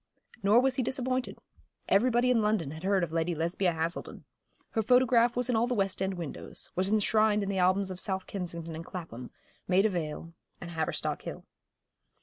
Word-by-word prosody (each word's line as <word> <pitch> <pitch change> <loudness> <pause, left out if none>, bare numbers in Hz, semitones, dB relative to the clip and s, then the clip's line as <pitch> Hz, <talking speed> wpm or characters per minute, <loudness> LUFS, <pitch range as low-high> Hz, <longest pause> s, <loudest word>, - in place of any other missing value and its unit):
Nor 210 +5 +5
was 265 0 +1
he - - +2
disappointed. 255 0 -1 0.5
Everybody 240 +4 +3
in 235 -3 +3
London 210 -9 0
had 160 +1 -8
heard 195 -1 +2
of 165 - -2
Lady 165 +1 0
Lesbia 170 +3 0
Haselden. 165 +1 -4 0.5
Her 225 - +1
photograph 245 0 +4
was 245 0 +1
in 250 - +1
all 225 +2 +2
the 250 - -1
West 195 -3 -1
End 190 0 0
windows, 170 -5 -6
was 190 +2 +1
enshrined 215 0 +3
in 200 - -3
the 195 -1 -1
albums 185 +1 +2
of 185 - -7
South 190 -2 -2
Kensington 170 -4 -5
and 165 - -6
Clapham, 160 -10 -8 0.4
Maida 195 +4 +4
Vale 165 -2 -4 0.3
and 170 - -8
Haverstock 160 -2 -2
Hill. - - -8
195 Hz, 180 wpm, -29 LUFS, 170-225 Hz, 0.5 s, Nor